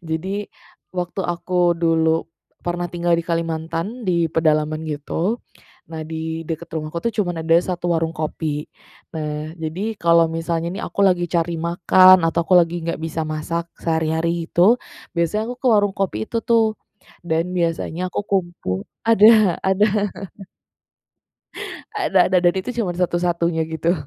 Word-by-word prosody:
Jadi, 190 +6 -3 0.5
waktu 180 +1 -3
aku 175 0 +1
dulu 165 -1 +2 0.4
pernah 175 0 -2
tinggal 175 0 0
di - - -1
Kalimantan, 165 +6 -3
di 170 -2 +2
pedalaman 155 -1 +1
gitu. 160 +8 -2 0.5
Nah 160 -1 -6
di 160 +1 -4
dekat 165 +1 -5
rumahku 155 +1 -3
tuh 230 +5 -2
cuman 175 -6 -1
ada 165 - +4
1 175 -1 -1
warung 165 0 0
kopi. 155 -1 -3 0.5
Nah 155 0 -4
jadi, 175 +7 -4
kalau 170 -3 +4
misalnya 165 +1 -2
nih - - -5
aku - - -8
lagi 175 -2 +1
cari 170 -1 0
makan, 175 +2 +5
atau 170 +1 +1
aku 180 +1 +5
lagi 170 0 +1
nggak 170 -1 -3
bisa 160 0 -3
masak 160 +2 -3
sehari-hari 165 +1 -1
itu, 185 +7 +5 0.4
biasanya 170 +6 0
aku 245 - -4
ke - - -1
warung 205 -2 +3
kopi 145 - -2
itu 230 - -2
tuh 225 -2 +3 0.5
dan 170 +2 -1
biasanya 170 +1 -1
aku - - -2
kumpul 175 - -2 0.2
ada 215 -4 +6
ada. 205 +2 +2 1.9
Ada 375 - +1
ada, 185 - +6
dan 175 0 +3
itu 190 +6 -2
cuman 200 -8 -2
satu-satunya 175 -2 0
gitu. 160 +1 0
170 Hz, 145 wpm, -21 LUFS, 160-185 Hz, 1.9 s, ada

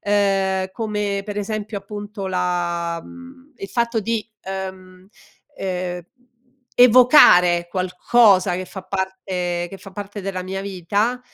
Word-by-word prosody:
ehm, 195 -2 +1
come, 210 -2 -2
pre 205 -1 -4
esempio, 215 +1 -4
appunto 205 0 -7
la 175 -2 -1
mhmm, 260 +2 -14
il 195 - -7
fatto 235 -1 0
di, 225 +1 -2 0.2
ehm 190 -1 -7 0.5
ehm, 180 -1 -3 0.8
evocare 235 - +7
qualcosa 185 +2 +3
che 185 +1 -3
fa 190 +1 -9
parte 185 -2 -3
che 195 - -9
fa 195 - -12
parte 205 +1 -7
della 190 -1 -4
mia 190 +1 -5
vita, 200 +5 -1
195 Hz, 120 wpm, -21 LUFS, 185-210 Hz, 0.8 s, evocare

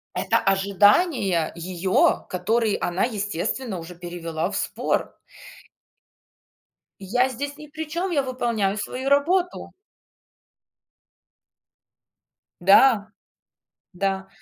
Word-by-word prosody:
Это - - +1
ожидания 200 - +2
её, 180 +2 +1
которые 215 +4 0
она, 175 +2 -1
естественно, 205 0 -2
уже 170 +2 -10
перевела 170 -1 -4
в 205 - -5
спор. - - -2 1.8
"Я 245 +7 +1
здесь 280 +3 -5
ни 300 0 -11
при 315 +2 -6
чём, 350 +4 -2
я 290 - +2
выполняю 235 -6 -1
свою 255 +6 -3
работу". 350 +6 +1 2.9
Да, 205 +4 +5 0.9
да. 190 +1 -2
205 Hz, 85 wpm, -23 LUFS, 185-265 Hz, 2.9 s, Да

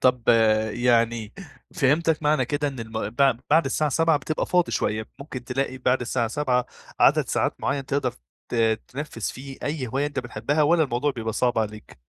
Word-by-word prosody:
طب 125 -2 +2 0.4
يعني 115 -2 +1 0.4
فهمتك 155 +3 +2
معنى 150 0 +2
كده 145 0 -1
إن 130 -4 -7
الم 110 -2 -4
بع 135 +3 +4 0.2
بعد 160 +3 +5
الساعة 150 +2 0
19:00 165 +2 +3
بتبقى 155 +1 -2
فاضي 180 -1 +2
شوية، 110 0 -1
ممكن 140 -3 -8
تلاقي 130 +1 -2
بعد 125 0 +1
الساعة 120 -1 -1
19:00 125 0 0 0.3
عدد - - +4
ساعات - - 0
معين 140 -1 -1
تقدر 135 -3 -1 0.3
ت - - -6 0.3
تنفّذ 145 -2 -7
فيه 135 +5 -5
أي 145 -3 -2
هواية 135 +5 -1
أنت 145 - -5
بتحبها 125 +5 -1
والّا 165 +2 +4
الموضوع 130 +2 0
بيبقى 115 -4 -4
صعب 120 +1 +1
عليك؟ 105 -6 -5
130 Hz, 175 wpm, -24 LUFS, 120-145 Hz, 0.4 s, بعد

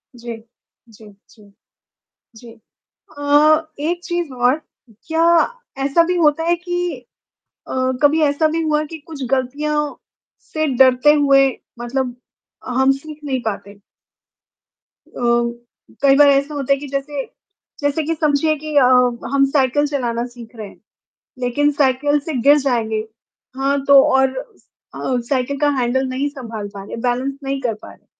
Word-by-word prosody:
जी। 235 -1 -7 0.5
जी, 215 0 -16 0.3
जी। 205 -2 -20 0.9
जी 235 +1 -13 0.7
अ, - - -7 0.6
एक 340 +4 -1
चीज़ 345 -5 -3
और 250 +5 +2 0.5
क्या 325 +1 +1 0.6
ऐसा 285 +5 +4
भी 360 +1 -1
होता 325 -1 +2
है 340 +1 +3
कि 350 -3 -3 0.7
अ, - - -6 0.3
कभी 300 +2 +4
ऐसा 295 +1 +2
भी 330 - -1
हुआ 305 -1 +1
कि 320 +1 -9
कुछ 310 -4 -8
गलतियाँ, 290 +3 -1 0.4
से 310 0 -3
डरते 260 +3 +5
हुए 275 -2 +4 0.3
मतलब 245 +1 -3 0.5
हम 265 +2 +3
सीख 300 +2 -8
नहीं 265 -3 -2
पाते? 200 -2 -6 1.3
अ, - - -10 0.8
कई 275 -1 +5
बार 290 0 +7
ऐसा 280 +2 +2
होता 280 -1 +1
है, 275 - 0
कि 290 - -8
जैसे, 275 0 -4 0.6
जैसे 285 +2 0
कि 330 +2 -2
समझिए 305 0 +1
की 305 -1 -5
अ, 265 - +6 0.5
हम 275 0 +4
साइकिल 290 +1 +2
चलाना 240 -5 -2
सीख 240 -1 -13
रहे 215 -2 -7
हैं, - - -17 0.6
लेकिन 255 +4 +1
साइकिल 285 +1 +2
से 315 +2 -6
गिर 290 +3 +6
जाएँगे। 230 -6 -1 0.6
हाँ, 275 +1 0
तो 280 -1 +8
और 265 0 +2
अ, 265 - -6
साइकिल 275 +1 -1
का 295 - +3
हैंडल 255 +2 0
नहीं 265 +3 -2
सँभाल 230 -7 -7
पा 195 -1 -8
रहे, - - -7
बैलेंस 255 +3 -1
नहीं 275 0 -2
कर 235 -3 -1
पा - - -11
रहे। - - -23
275 Hz, 150 wpm, -19 LUFS, 250-300 Hz, 1.3 s, तो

